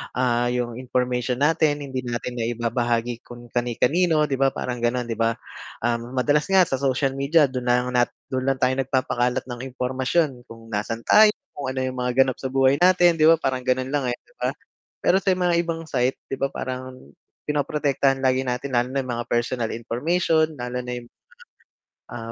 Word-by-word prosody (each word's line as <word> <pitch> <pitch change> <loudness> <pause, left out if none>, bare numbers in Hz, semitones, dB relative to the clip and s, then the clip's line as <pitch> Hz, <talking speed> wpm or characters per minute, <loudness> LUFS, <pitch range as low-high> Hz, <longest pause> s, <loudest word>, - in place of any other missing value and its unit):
ah, 120 -1 +1
'yung 120 -1 -2
information 125 -1 -1
natin, 150 -1 +2
hindi 135 -2 -4
natin 120 +1 -4
naibabahagi 120 0 -1
kung 120 0 -12
kani-kanino, 150 +7 +1
di 135 - 0
ba, 135 0 +2
parang 125 -1 -3
gano'n 120 +1 0
di 115 - -3
ba. 115 0 +2 0.5
Um, 120 +1 -2
madalas 145 +4 +2
nga 195 -1 +5
sa 135 -6 -1
social 135 0 +1
media 145 +1 +3
do'n 125 -1 -4
na 120 - +5
lang 125 - -4
nat 120 - +3 0.2
do'n 130 0 -1
lang 135 -1 0
tayo 130 +1 +2
nagpapakalat 125 -1 0
ng 120 -1 -6 0.2
impormasyon, 130 +1 -1
kung 115 0 -13
nasaan 115 +2 -3
tayo, 215 0 +6 0.2
kung 140 -2 -6
ano 130 0 -3
'yung 130 0 -3
mga 125 0 0
ganap 130 -2 -3
sa 130 - -3
buhay 135 +1 +3
natin, 175 -2 +5
di 155 - +6
ba, 165 - +8
parang 135 -5 -1
gano'n 130 +1 0
lang, 145 -3 0
eh, 120 - -1
di - - -28
ba. - - 0 0.5
Pero 190 - +4
sa 190 -1 +1
mga 180 -1 +1
ibang 165 -1 -4
site 130 -4 0 0.2
diba, 135 +1 0
parang, 130 0 -5 0.5
pinoprotektahan 140 -2 0
lagi 130 0 +3
natin 125 +2 -3
lalo 120 +1 +2
na 135 0 -1
'yung 130 - -5
mga 120 - -5
personal 120 0 0
information, 155 +8 +1
lalo 125 0 -4
na 125 0 -6
'yung, 120 -1 -9 1.0
ah, 115 -1 -7
130 Hz, 190 wpm, -23 LUFS, 120-145 Hz, 1.0 s, ba